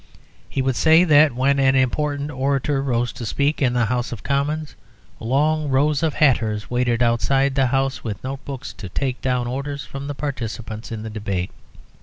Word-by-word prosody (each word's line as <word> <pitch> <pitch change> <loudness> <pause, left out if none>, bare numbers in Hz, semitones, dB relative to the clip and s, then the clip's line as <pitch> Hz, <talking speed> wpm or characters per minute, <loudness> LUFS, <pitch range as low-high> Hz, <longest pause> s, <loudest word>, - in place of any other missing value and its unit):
He 135 - -1
would 130 -1 0
say 160 +5 +5
that 150 -5 +5
when 140 +2 +2
an 135 0 +4
important 145 +3 0
orator 135 +1 0
rose 120 -3 -1
to - - -8
speak 145 +7 0
in 125 -3 +2
the 120 -1 +2
House 120 +2 -1
of 120 - -7
Commons, 145 +2 -1 0.5
long 150 +5 +1
rows 140 +2 +2
of 160 -2 0
hatters 115 -8 +1
waited 120 -1 +1
outside 135 +4 +2
the 135 -1 +2
House 135 +1 0
with 105 -4 -5
note 135 +1 -5
books 140 0 -7
to 95 - -9
take 130 +6 -2
down 125 -2 0
orders 140 +3 -4
from 140 +1 -7
the 145 - -4
participants 115 -6 -5
in 110 -1 -5
the 110 - -6
debate. 100 -4 -3
135 Hz, 185 wpm, -22 LUFS, 120-140 Hz, 0.5 s, say